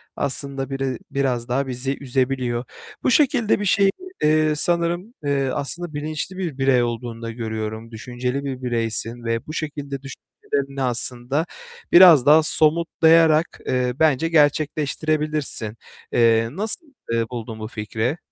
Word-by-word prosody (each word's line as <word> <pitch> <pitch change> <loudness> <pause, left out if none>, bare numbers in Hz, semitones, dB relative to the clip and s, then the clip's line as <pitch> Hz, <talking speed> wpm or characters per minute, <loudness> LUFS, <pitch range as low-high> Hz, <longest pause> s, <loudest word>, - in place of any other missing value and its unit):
aslında 135 -1 -2
biri 135 -2 -2
biraz 130 -3 -1
daha 135 +2 0
bizi 130 +2 -3
üzebiliyor. 130 -2 -1 0.4
Bu - - +2
şekilde 250 -7 +3
bir 205 - -2
şeydi. 195 +1 +4 0.3
Eee, 155 0 +3
sanırım, 175 +6 0
eee, 140 -2 0
aslında 155 +3 -3
bilinçli 155 +5 -4
bir 165 -8 -4
birey 135 -2 +3
olduğunu 120 0 -4
da 115 0 -5
görüyorum, 110 0 -5
düşünceli 125 +4 -4
bir 130 -2 -5
bireysin 115 0 -1
ve 115 0 -2
bu 155 - -6
şekilde 145 -3 -5
düşüncelerini 135 +1 -5
aslında 125 +5 -1 0.5
biraz 175 -7 +8
daha 155 +2 +6
somutlayarak, 160 0 +3
eee, 125 -1 0
bence 160 +1 +3
gerçekleştirebilirsin. 150 -5 0 0.3
Eee, 115 -1 +3
nasıl, 215 - -1 0.3
eee, 115 0 +1
buldun 115 -2 -6
bu 110 - -5
fikri? 110 +5 -3
135 Hz, 130 wpm, -22 LUFS, 120-155 Hz, 0.5 s, biraz